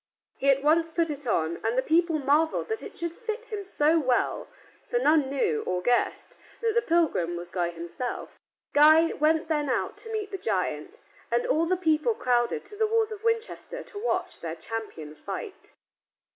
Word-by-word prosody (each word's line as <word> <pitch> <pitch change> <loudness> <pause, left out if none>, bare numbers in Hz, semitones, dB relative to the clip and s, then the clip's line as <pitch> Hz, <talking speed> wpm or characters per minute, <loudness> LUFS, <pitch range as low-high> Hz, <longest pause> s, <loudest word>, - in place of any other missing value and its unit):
He 275 - +2
at 275 0 +3
once 325 +2 +3
put 330 -1 0
it 285 -2 -6
on, 165 -5 0
and 225 +3 0
the 260 - +3
people 330 0 +2
marveled 300 +6 +1
that 445 - -1
it - - -9
should 340 -1 -3
fit 455 +2 -5
him 425 -4 -5
so 325 -4 +2
well, 255 -4 0 0.4
for 485 - -2
none 310 - +3
knew, 260 - 0
or 180 0 0
guessed, 245 +7 0 0.2
that 455 -1 0
the 470 - +3
pilgrim 320 - +1
was 175 0 -7
Guy 175 -2 0
himself. 170 +9 -6 0.3
Guy 310 +3 +6
went 315 +2 +2
then 300 -3 0
out 255 - -1
to 450 - -8
meet 425 -2 -3
the 390 - -4
giant, 375 - -2 0.3
and 485 - +1
all 330 -9 +2
the 370 +1 +1
people 325 +5 +2
crowded 240 - 0
to 410 +1 -7
the 440 +1 +1
walls 445 0 +1
of 430 0 -7
Winchester 460 +2 -2
to 410 - -9
watch - - -1
their 165 -1 -4
champion 170 -5 -6
fight. 395 - -7
315 Hz, 185 wpm, -27 LUFS, 250-410 Hz, 0.4 s, Guy